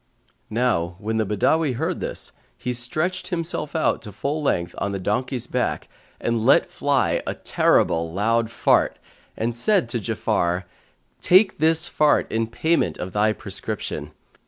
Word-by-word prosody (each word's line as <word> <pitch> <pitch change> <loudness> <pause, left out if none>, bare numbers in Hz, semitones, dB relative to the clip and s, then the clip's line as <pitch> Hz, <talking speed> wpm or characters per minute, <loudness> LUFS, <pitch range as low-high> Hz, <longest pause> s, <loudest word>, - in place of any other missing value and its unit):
Now 105 -7 0
when 110 +3 -2
the 110 -2 0
Badawi 140 +8 +2
heard - - -2
this, - - -4 0.3
he 125 - -3
stretched 155 +10 -1
himself 165 -4 -2
out 160 - +1
to 105 - -9
full 140 +10 -3
length 85 -11 0
on 100 0 -2
the 100 - -3
donkey's 120 +6 -1
back - - -2 0.3
and 115 -1 -1
let 130 - +4
fly 140 -2 +1
a - - -2
terrible 80 0 +2
loud 115 +5 +1
fart[FN#142] 115 - +2 0.4
and 115 +1 -1
said 185 - +2
to 120 - -1
Ja'afar, 90 -3 0 0.6
"Take 190 0 +4
this 160 +2 +3
fart 150 -1 +2
in 115 0 0
payment 160 +9 0
of 90 0 -6
thy 105 +1 +3
prescription. - - -4
115 Hz, 150 wpm, -23 LUFS, 105-150 Hz, 0.6 s, let